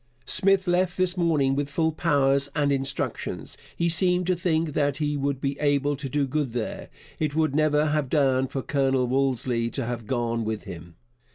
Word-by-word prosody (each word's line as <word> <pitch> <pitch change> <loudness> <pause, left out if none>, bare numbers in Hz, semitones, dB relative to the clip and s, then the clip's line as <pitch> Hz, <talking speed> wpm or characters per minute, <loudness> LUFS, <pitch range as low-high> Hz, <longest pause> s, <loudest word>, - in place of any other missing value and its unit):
Smith 195 0 +3
left 180 0 +1
this 185 -1 +2
morning 155 -7 +2
with 145 0 -2
full 160 +3 0
powers 140 -4 +2
and 145 -2 +1
instructions. 135 0 -3 0.2
He 170 - 0
seemed 180 +2 +2
to 185 +1 +1
think 165 -3 0
that 145 -2 0
he 150 -1 -1
would 140 -1 -1
be 140 0 -3
able 145 0 +1
to 135 -1 -5
do 145 +1 0
good 135 -2 -2
there. 120 -3 -4 0.3
It 150 -2 -1
would 155 -3 +1
never 150 0 +2
have 150 -3 0
done 135 -3 +2
for 135 0 -4
Colonel 135 -2 +1
Wolseley 125 -2 0
to 135 0 -4
have 120 -2 -5
gone 115 -2 -1
with 110 -1 -3
him. 85 -4 -10
140 Hz, 185 wpm, -25 LUFS, 130-155 Hz, 0.3 s, Smith